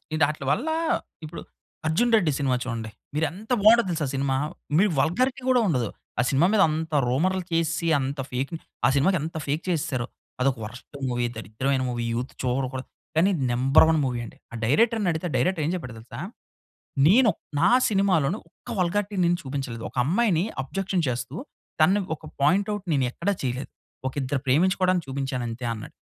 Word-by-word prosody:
ఇదాట్లీ 150 -2 +1
వల్ల, 285 +8 0 0.6
ఇప్పుడు 155 - -7 0.5
'అర్జున్ 230 +10 +2
రెడ్డి' 175 -8 +3
సినిమా 135 -3 +1
చూడండి. 115 -3 -4 0.3
మీరు 160 - +2
ఎంత 210 +8 -10
బావుంటది 225 +1 +6
తెలుసా 160 -3 -1
ఆ - - -4
సినిమా! 135 0 0 0.4
మీ 190 - +5
వల్‌గారి‌టి 255 - +1
కూడా 255 -1 +5
ఉండదు. 125 - +1 0.3
ఆ - - +6
సినిమా 150 +4 +4
మీద 210 - +5
అంత 160 +1 -3
రూమర్‌లు 180 +9 +1
చేసేసి, 165 0 0
అంత 135 +1 -3
ఫేక్ 130 +5 -2 0.3
ఆ - - +6
సినిమాకి 180 +7 +3
ఎంత 160 +2 -5
ఫేక్ 145 +4 -1
చేసేసారో. 135 -7 -1 0.3
అదొక 130 0 +2
వర్‌స్ట్ 125 +6 -11
మూవీ, 120 0 0
దరిద్రమైన 130 +5 -1
మూవీ, 120 -1 -2
యూత్ 125 +2 -4
చూడకూడదు. 130 +1 -2 0.3
కానీ 185 +5 +4 0.2
నంబర్ 135 +6 +5
వన్ 160 -1 +3
మూవీ 125 -2 -1
అండి. - - -12 0.2
ఆ - - -5
డైరెక్టర్‌నడిగితే, 180 - +2
ఆ - - -6
డైరెక్టర్ 180 -4 +1
ఏం - - 0
చెప్పాడో 125 -9 -6
తెలుసా? 120 +1 -10 0.9
నేను 225 +6 +6 0.3
నా 170 - +5 0.2
సినిమాలోను 195 -4 +2
ఒక్క - - -20
వల్‌గారి‌టి 200 +3 0
నేను 175 0 +3
చూపించలేదు. 130 -4 -4
ఒక - - -24
అమ్మాయిని 185 - +2 0.2
అబ్జెక్షన్ 190 +5 -1
చేస్తూ, 125 +2 -3 0.5
తనను 190 +6 +4
ఒక 155 - -22 0.2
పాయింట్ 195 +7 +3
ఔట్ 205 -1 -7
నేను 135 -3 +2
ఎక్కడ 170 - -5
చేయలేదు. 125 0 -3 0.4
ఒక 130 - -3
ఇద్దరు 130 +1 -1
ప్రేమించుకోవడానికి 180 +5 +3
చూపించాను 135 -2 -2
అంతే 115 +2 -6
అన్నాడు. 110 - -8
155 Hz, 170 wpm, -25 LUFS, 130-185 Hz, 0.9 s, బావుంటది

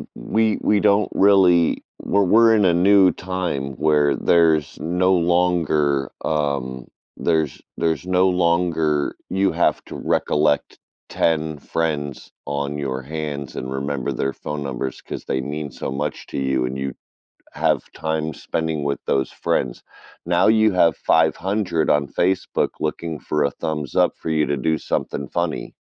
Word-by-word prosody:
we 110 -1 0
we 105 - +3
don't 105 0 +3
really 95 -4 +4 0.2
well, 100 0 +2
were 115 +4 +5
In 105 -3 +3
a 85 - +4
new 95 +1 +5
time 90 -8 -3
where 75 -2 +3
there's 80 -4 +2
no 90 +3 +1
longer, 85 -5 +1
um, 70 -5 -2 0.3
there's 80 -4 0 0.2
there's 80 -2 -1
no 95 +1 +3
longer 85 -4 +1
you 95 0 +1
have - - +1
to - - -9
recollect 75 -1 0 0.3
10 80 -2 0
friends 75 -3 -3 0.2
on 70 0 -2
your 65 -2 -3
hands 75 -1 -5
and 65 +1 -5
remember 65 -1 -2
their 70 0 -2
phone 75 -1 -5
numbers 65 -1 -4
'cause - - -7
they 65 - -1
mean 75 +2 -4
so - - -5
much 70 +2 -4
to - - -6
you 65 -2 0
and 65 +2 -4
you 70 -1 -3 0.6
have - - +1
time 80 -1 -3
spending 80 -2 -3
with 70 0 -1
those 65 -2 0
friends. - - -2 0.4
Now 90 +1 +3
you 110 -1 +4
have 85 -3 +3
500 85 +1 +1
on 75 -1 +2
Facebook 90 +7 0
looking 80 0 -3
for 75 -1 -1
a 70 - +2
thumbs 75 -3 -4
up - - +4
for - - -7
you 75 -1 +2
to 75 - -1
do 80 +4 0
something 70 - -3
funny. 85 -1 -3
80 Hz, 150 wpm, -21 LUFS, 70-90 Hz, 0.6 s, were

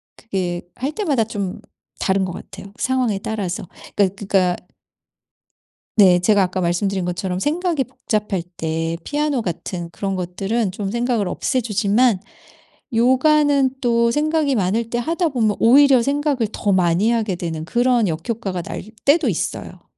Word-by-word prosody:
그게 180 -5 -3
할 265 +4 -2
때마다 300 - 0
좀 200 -4 -4 0.4
다른 190 0 +1
것 180 - -4
같아요, 195 +2 -10
상황에 255 -6 0
따라서. 195 -4 -4 0.3
그니까 195 -2 +2
그니까 190 -3 +1 1.4
네. 190 -4 +6
제가 205 +3 +3
아까 185 0 0
말씀드린 185 +2 0
것처럼 180 +1 -2
생각이 320 - 0
복잡할 215 -7 -2 0.2
때 165 +1 -2
피아노 295 -4 -1
같은 175 -1 -4
그런 195 +2 -3
것들은 195 +4 -2
좀 200 0 -4
생각을 235 -2 0
없애 255 +7 -1
주지만 215 0 +2 0.7
요가는 270 +3 +4
또 235 -2 +3
생각이 300 +1 +1
많을 220 +3 0
때 240 +1 -1
하다 335 +5 0
보면 225 -7 0
오히려 265 +2 +6
생각을 280 -3 0
더 205 - 0
많이 185 +4 +3
하게 220 -5 0
되는 160 -2 -4
그런 240 +2 +2
역효과가 185 +3 -3
날 - - -6 0.2
때도 295 +1 +4
있어요. 180 -2 -3
215 Hz, 305 characters per minute, -20 LUFS, 185-255 Hz, 1.4 s, 네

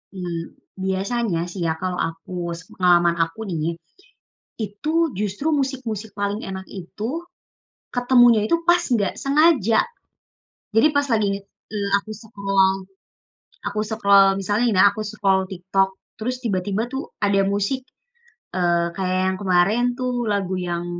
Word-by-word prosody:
Mmm, 170 -2 -5 0.3
biasanya 190 0 -1
sih 185 - -6
ya 160 - +1
kalau 180 -1 -2
aku 165 +2 -4 0.2
sepengalaman 175 0 +2
aku 165 +6 -7
nih, 165 -1 -2 0.9
itu 210 +8 -5 0.3
justru 210 +8 -2
musik-musik 250 -7 -2
paling 205 +1 -1
enak 190 0 -5
itu, 220 - -5 0.7
ketemunya 245 -2 +5
itu 220 - +2
pas 350 0 +5
enggak 205 -6 +2
sengaja. 275 - +3 0.9
Jadi 225 +6 +6
pas 285 0 +2
lagi 220 -4 +2
nge 200 - -3 0.3
eee, 205 -2 -2
aku 200 +2 -5
scroll 195 -3 0 0.8
aku 205 +1 -3
scroll 200 -2 +5
misalnya 205 +4 0
nih - - 0
ya 190 - +7
aku 215 - -5
scroll 195 -3 +2
TikTok 190 +1 +1 0.3
terus 250 +3 -2
tiba-tiba 200 0 -1
tuh 265 +1 -2 0.2
ada 200 -1 +2
musik, 200 +6 0 0.8
eee, 175 -1 +2
kayak 185 -1 0
yang 190 - -2
kemarin 195 +4 +3
tuh 245 -2 -2
lagu 195 -3 0
yang 175 -1 -3
200 Hz, 135 wpm, -22 LUFS, 185-230 Hz, 0.9 s, ya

